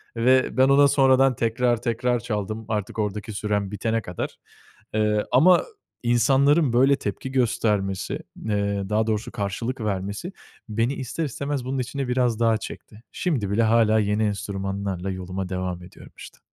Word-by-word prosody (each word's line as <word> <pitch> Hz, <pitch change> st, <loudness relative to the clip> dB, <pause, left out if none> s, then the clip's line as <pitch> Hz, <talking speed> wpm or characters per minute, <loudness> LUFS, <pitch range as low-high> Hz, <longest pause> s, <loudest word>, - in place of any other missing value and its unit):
ve 130 Hz, +3 st, +3 dB
ben 130 Hz, +1 st, +5 dB
ona 140 Hz, +1 st, +6 dB
sonradan 135 Hz, -1 st, +4 dB
tekrar 120 Hz, +1 st, +1 dB
tekrar 120 Hz, 0 st, 0 dB
çaldım. 110 Hz, -1 st, -4 dB
Artık 105 Hz, 0 st, -3 dB
ordaki 105 Hz, +1 st, -3 dB
sürem 105 Hz, -1 st, -1 dB
bitene 115 Hz, +2 st, -1 dB
kadar. 90 Hz, -4 st, -5 dB, 0.6 s
Iıı, 105 Hz, -1 st, +1 dB
ama 165 Hz, +9 st, +6 dB, 0.4 s
insanların 135 Hz, +4 st, +3 dB
böyle 135 Hz, +3 st, +5 dB
tepki 120 Hz, +2 st, -5 dB
göstermesi, 105 Hz, -6 st, 0 dB, 0.3 s
ııı, 100 Hz, -2 st, -1 dB
daha 110 Hz, +1 st, +1 dB
doğrusu 110 Hz, +2 st, -2 dB
karşılık 115 Hz, +5 st, -3 dB
vermesi 100 Hz, -, -3 dB, 0.4 s
beni 115 Hz, +5 st, 0 dB
ister 135 Hz, +4 st, -3 dB
istemez 140 Hz, -1 st, -3 dB
bunun 130 Hz, +1 st, -2 dB
içine 135 Hz, +2 st, -3 dB
biraz 125 Hz, -2 st, +1 dB
daha 115 Hz, -1 st, +3 dB
çekti. 110 Hz, 0 st, -10 dB
Şimdi 135 Hz, -, -1 dB
bile 110 Hz, +3 st, +2 dB
hâlâ 110 Hz, -1 st, +4 dB
yeni 105 Hz, +1 st, +1 dB
enstrümanlarla 100 Hz, -2 st, -3 dB
yoluma 95 Hz, 0 st, -5 dB
devam 90 Hz, -1 st, -3 dB
ediyorum 90 Hz, -, -14 dB
işte. -, -, -12 dB
110 Hz, 145 wpm, -24 LUFS, 100-130 Hz, 0.6 s, ona